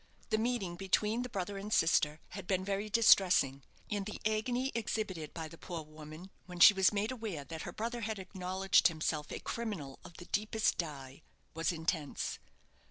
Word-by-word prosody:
The 220 - +3
meeting 220 -7 -1
between 210 +5 +1
the 250 - -4
brother 195 -1 -3
and 205 +2 -7
sister 155 -4 +3
had 195 -3 -8
been 185 -1 0
very 200 +2 -2
distressing, 185 - +5 0.3
and 205 -2 -2
the 210 - -6
agony 240 +5 0
exhibited 205 -8 -3
by 160 -2 -5
the 165 +1 -13
poor 170 -3 -5
woman 155 +4 -11 0.2
when 180 -1 -8
she 205 - +10
was 190 -1 +4
made 210 +3 -1
aware 220 - -4
that 160 +2 -7
her - - -5
brother 235 +2 -3
had 220 -1 -2
acknowledged 190 0 +2
himself 155 -2 -2
a - - -4
criminal 200 -13 -5
of 170 - -12
the 175 - -10
deepest 215 +3 0
dye, 140 -4 -5 0.3
was 165 0 0
intense. 160 -3 -2
190 Hz, 175 wpm, -33 LUFS, 160-215 Hz, 0.3 s, she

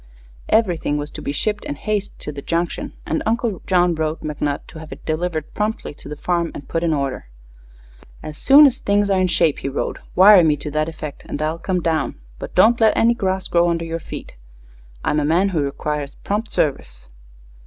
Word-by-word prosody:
Everything 175 -9 +2
was 145 0 -4
to - - -8
be 140 - -3
shipped 210 +8 -1
in 145 - -4
haste 210 +5 -3
to - - -6
the 140 -1 -7
Junction, 170 +3 -2
and 160 - -1
Uncle 225 -3 -1
John 180 -2 +3
wrote 160 0 -2
McNutt 150 -1 -3
to 160 - -10
have 160 -1 -11
it - - -10
delivered 160 -1 -2
promptly 215 -6 -2
to - - -12
the 150 - -5
farm 170 +2 -1
and 140 - -9
put 165 - -1
in 170 - +2
order. 140 - -2 1.0
"As 155 0 -8
soon 285 +2 +8
as 260 -3 +2
things 200 0 +1
are 190 -1 +3
in 185 - +3
shape," 160 -4 +2
he 135 - -3
wrote, 140 - -3 0.2
"wire 190 0 +8
me 150 -2 +3
to 145 +1 -6
that 155 +2 0
effect 155 -3 -8
and - - -4
I'll 155 +2 -1
come 180 +1 -1
down. 160 -3 0 0.2
But - - -8
don't 230 +6 +5
let 220 -1 +4
any 235 +1 +4
grass 190 -4 -2
grow 170 0 +3
under 165 -1 -1
your 165 0 -3
feet. - - -8 0.7
I'm 150 - +2
a - - 0
man 170 +6 +2
who 165 -5 0
requires 145 0 -3
prompt 210 +3 -3
service." - - -2
165 Hz, 205 wpm, -20 LUFS, 150-195 Hz, 1.0 s, soon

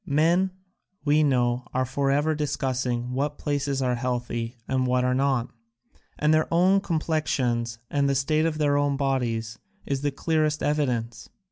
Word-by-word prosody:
Men, 170 +3 +2 0.6
we 150 +1 +4
know, 125 -3 +1
are 130 0 +2
forever 140 +4 +1
discussing 130 -4 -2
what 145 +3 -1
places 140 -2 -1
are 125 -1 +1
healthy 120 -1 -3
and 130 -1 0
what 125 0 +2
are 125 0 +2
not, 130 -2 +1 0.7
and 150 +1 +3
their 155 0 +2
own 185 +4 +4
complexions 135 -9 -1
and 140 +1 +1
the 140 - +1
state 155 +4 +2
of 155 -2 -2
their 145 -2 +2
own 145 -1 +1
bodies 115 -5 -1 0.3
is 135 -1 -2
the 145 - +1
clearest 155 +1 0
evidence. 120 -6 -1
140 Hz, 150 wpm, -25 LUFS, 125-150 Hz, 0.7 s, we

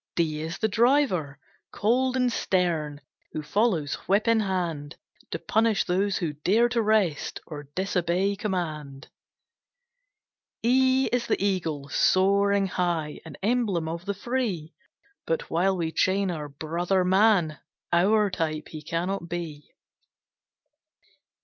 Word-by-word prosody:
D 160 -3 0
D - - -4
is 165 +1 -4
the 220 - +1
Driver, 220 - +2 0.3
cold 250 +4 +1
and 250 -2 +1
stern, 160 -8 0 0.3
Who 155 - -4
follows, 165 -3 +1
whip 200 +5 +2
in 230 -1 +4
hand, 170 -7 -2 0.3
To - - -3
punish 220 +3 +1
those 190 +2 0
who 165 -4 -2
dare 200 +11 +2
to 235 -1 +1
rest, 210 -8 +1
Or 145 -3 -9
disobey 185 +1 0
command. 155 -9 -4 1.5
E 260 +2 +4
E - - -2
is 240 -1 -2
the - - +1
Eagle, 165 -8 -1
soaring 200 +4 +3
high; 170 -5 -2
An 160 - -10
emblem 210 -7 +1
of 170 +2 -5
the 200 0 -2
free; 205 -8 -2 0.5
But 165 - -2
while 185 +3 +2
we 165 -2 -2
chain 190 +2 +1
our 150 -3 -5
brother 170 +6 -1
man, 190 -5 +3 0.3
Our 205 +4 +3
type 155 -3 -3
he 155 - -8
cannot 170 +3 -3
be. 160 -4 -6
180 Hz, 130 wpm, -26 LUFS, 160-210 Hz, 1.5 s, in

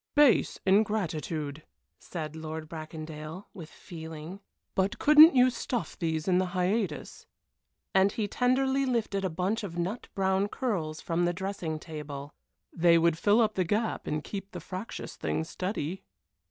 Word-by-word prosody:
"Base 290 -5 +5
ingratitude," 170 -7 0 0.4
said 160 -3 -6
Lord 160 0 -6
Bracondale, 155 +2 -7
with 170 -6 -9
feeling; 160 +2 -9 0.3
"but 190 +1 0
couldn't 305 +1 +8
you 255 0 +6
stuff 240 -1 -3
these 160 -2 -2
in 180 -1 +4
the 185 - +1
hiatus," 180 -4 -1 0.7
and 190 +1 +5
he 215 -1 -2
tenderly 265 +4 +2
lifted 230 -6 0
a 190 - +1
bunch 185 +7 -1
of 175 -4 -6
nut 185 +7 -3
brown 190 +1 +2
curls 175 -11 -2
from 170 +1 0
the 175 - +1
dressing 185 -4 -3
table. 150 -3 -7 0.4
"They 170 0 +5
would 165 -1 +3
fill 205 +7 +4
up 215 -1 +2
the 185 - +1
gap 215 +5 -1
and 150 0 -1
keep 195 -1 -6
the 180 - -5
fractious 185 +6 -6
thing - - -1
steady." 180 0 -4
185 Hz, 150 wpm, -29 LUFS, 160-210 Hz, 0.7 s, couldn't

